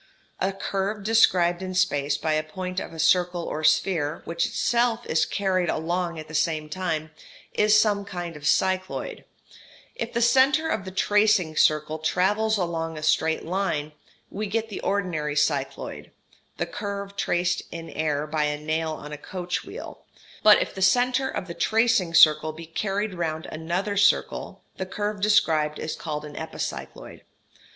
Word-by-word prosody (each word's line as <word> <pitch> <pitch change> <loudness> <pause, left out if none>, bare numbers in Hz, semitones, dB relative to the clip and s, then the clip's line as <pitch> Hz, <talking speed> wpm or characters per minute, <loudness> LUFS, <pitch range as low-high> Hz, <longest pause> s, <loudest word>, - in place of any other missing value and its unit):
A 190 - +1
curve 195 +1 -3
described 185 -5 +3
in 185 -1 -5
space 145 -5 +1
by 155 - -1
a 155 - +2
point 180 +4 -5
of - - -7
a 165 - -10
circle 175 +2 +2
or 155 -1 -4
sphere, 160 -2 +1
which 170 0 0
itself 240 0 +1
is 160 - +1
carried 185 -3 0
along 170 +1 -1
at 155 0 -8
the 155 - -11
same 155 -1 0
time, 160 -3 -3 0.4
is 210 0 +5
some 205 -2 +2
kind 175 -4 -6
of 150 0 -5
cycloid; 185 0 0 0.7
if - - -4
the 235 - -1
centre 270 +6 +4
of 215 -11 -2
the - - -5
tracing 205 -4 +2
circle 155 0 +2
travels 210 +7 +1
along 165 -3 -2
a 155 - -7
straight 160 +1 +1
line, 165 -4 -1 0.4
we 210 +1 -3
get 225 +2 -2
the 205 - -5
ordinary 170 -7 -1
cycloid, 150 0 -1 0.5
the - - -1
curve 200 -1 -5
traced 175 -2 0
in 165 -1 -7
air 150 -2 -1
by 155 0 0
a 150 0 -1
nail 155 +1 -1
on 150 -1 -8
a 150 - -7
coach 180 +2 -4
wheel; - - -9 0.4
but 210 -1 +7
if - - -2
the 190 - -7
centre 250 +6 +3
of - - -4
the 170 - -6
tracing 220 -1 +2
circle 155 -1 +6
be 165 +2 -10
carried 200 +5 -2
round 160 -3 -3
another 175 +6 -2
circle 200 0 +1
the 190 - -3
curve 205 +1 -3
described 160 -8 +3
is 155 - -4
called 150 -2 -5
an 150 - -9
epicycloid. 160 - -6
180 Hz, 165 wpm, -25 LUFS, 155-200 Hz, 0.7 s, but